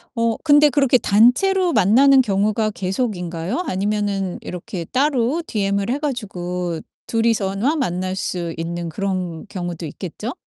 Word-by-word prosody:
어 230 -1 +1
근데 295 -1 +6
그렇게 275 -3 +3
단체로 335 - +3
만나는 265 +7 +5
경우가 215 0 +1
계속인가요? 185 - -3
아니면은 200 -2 -1
이렇게 180 0 -6
따로 265 - +1
DM을 200 0 -1
해 270 - 0
가지고 180 - -3 0.3
둘이서만 225 +4 +1
만날 185 -5 -2
수 175 -3 -3
있는 170 +1 -4
그런 180 -1 -3
경우도 175 -2 -5
있겠죠? 185 - -6
200 Hz, 305 characters per minute, -20 LUFS, 180-250 Hz, 0.3 s, 근데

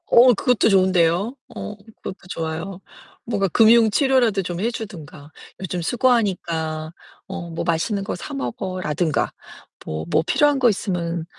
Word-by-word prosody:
어우, 245 +1 +7
그것도 240 +1 +2
좋은데요. 185 +3 +3 0.2
어, 210 - -6 0.3
그것도 190 - -6 0.2
좋아요. 165 +4 -5 0.4
뭔가 205 -4 0
금융 225 +4 +5
치료라도 245 -4 +2
좀 175 -2 -5
해 230 +5 0
주든가. 160 -10 -9 0.3
"요즘 180 -1 -3
수고하니까. 170 -8 0 0.4
어 190 -3 -6
뭐 165 - -4
맛있는 185 +5 0
거 200 - -3
사 175 - -8
먹어."라든가. 155 +4 -2 0.5
뭐 80 0 -4
"뭐 155 - +3
필요한 290 +4 +3
거 250 -2 +5
있으면 175 -5 -2
185 Hz, 300 characters per minute, -22 LUFS, 165-220 Hz, 0.5 s, 어우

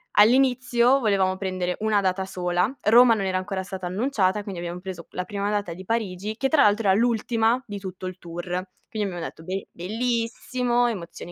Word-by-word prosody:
all'inizio, 250 +2 +4
volevamo 195 -5 +1
prendere 185 -2 -2
una 215 -1 +2
data 190 0 0
sola. 180 +3 -1
Roma 235 +3 +7
non 205 -3 -1
era 185 -1 0
ancora 190 0 -3
stata 185 -1 -6
annunciata, 205 -1 0
quindi 195 -4 -6
abbiam 175 +1 -5
preso 185 -3 -7
la 180 - -3
prima 200 0 -2
data 205 -5 -1
di 185 +3 -10
Parigi 210 -1 -2
che, 270 +1 0
tra 310 -3 +5
l'altro, 210 0 +3
era 190 - +5
l'ultima 230 +1 +2
di 205 -2 -5
tutto 185 -1 -7
il 185 0 -7
tour. 170 0 -7 0.5
Quindi 210 -2 -2
abbiamo 175 -3 -5
detto: 160 - -9
"Be 190 +3 -4
bellissimo, 240 +4 -1
emozione 175 -5 -6
200 Hz, 185 wpm, -25 LUFS, 185-230 Hz, 0.5 s, Roma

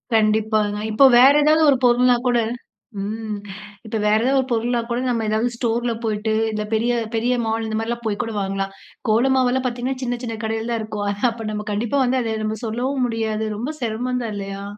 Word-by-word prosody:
கண்டிப்பாங்க. 215 -1 +2
இப்போ 270 +6 +6
வேற 270 +3 +8
ஏதாவது 310 +1 +4
ஒரு 265 - +3
பொருள்னா 245 0 +4
கூட 245 -1 +3 0.6
ம் 215 +1 -4 0.5
இப்போ 220 0 -3
வேற 210 0 +4
ஏதாவது 270 +1 +3
ஒரு 260 - -6
பொருள்னா 235 +1 +1
கூட 235 +1 -1
நம்ம 230 -2 0
ஏதாவது 220 +3 +1
ஸ்டோர்ல 235 0 -1
போயிட்டு 220 0 -1 0.2
இல்ல 210 0 -2
பெரிய 235 +2 +1 0.2
பெரிய 240 +3 +1
மால். 225 0 -1
இந்த 220 - -3
மாதிரிலாம் 235 +1 -3
போய் 205 -2 -1
கூட 225 - -5
வாங்கலாம். 195 0 -2 0.4
கோல 240 +5 +3
மாவெல்லாம் 255 0 +1
பார்த்தீங்கன்னா 255 +2 -2
சின்ன 245 0 -1
சின்ன 225 -2 -4
கடையில 225 +1 -2
தான் 230 -1 -1
இருக்கும். 210 -1 -4 0.2
அப்போ 225 -1 -7
நம்ம 210 0 -4
கண்டிப்பா 230 +7 0
வந்து 255 +1 +1
அத 225 -1 -2
நம்ம 215 0 -2
சொல்லவும் 250 +4 -1
முடியாது 220 -1 -2
ரொம்ப 265 +8 -3
செரமம் 245 +2 -2
தான் 220 -2 -4
இல்லையா? 195 0 -6
225 Hz, 190 wpm, -21 LUFS, 215-245 Hz, 0.6 s, வேற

